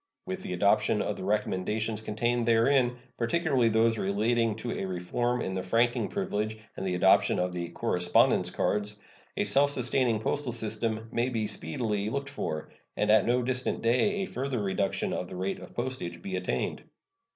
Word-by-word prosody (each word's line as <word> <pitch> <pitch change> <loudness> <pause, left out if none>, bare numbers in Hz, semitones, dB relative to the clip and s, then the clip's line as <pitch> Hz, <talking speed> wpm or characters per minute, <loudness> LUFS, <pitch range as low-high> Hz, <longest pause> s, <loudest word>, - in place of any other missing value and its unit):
With 190 0 -4
the 90 - -5
adoption 100 +3 +2
of - - -2
the - - -7
recommendations 105 +2 -1
contained 120 +2 -1
therein, 125 +2 +3 0.2
particularly 130 -1 +2
those 110 0 +3
relating 110 +3 +1
to 115 +2 -5
a - - -3
reform 120 +7 -1
in 95 - -3
the 95 - -2
franking 115 +6 +1
privilege 110 - -2 0.2
and - - -5
the 95 -1 -1
adoption 95 +2 +4
of 90 0 0
the 85 -1 -4
"correspondence 90 +1 +2
cards," 105 0 -1 0.4
a - - +2
self 140 +1 +4
sustaining 125 -3 +1
postal 130 +2 -1
system 110 0 -2
may 120 -2 0
speedily 105 +2 -2
be - - -1
looked 140 +3 -3
for, 80 - -4 0.3
and 105 0 +2
at 110 -1 +5
no 125 +1 +2
distant 125 +1 -2
day 130 - +2
a - - -1
further 135 -6 -3
reduction 100 0 -1
of 90 - -3
the - - -8
rate 95 +2 -2
of - - -12
postage 125 -8 -4
be 195 0 -5
attained. - - -2
115 Hz, 175 wpm, -29 LUFS, 100-125 Hz, 0.4 s, at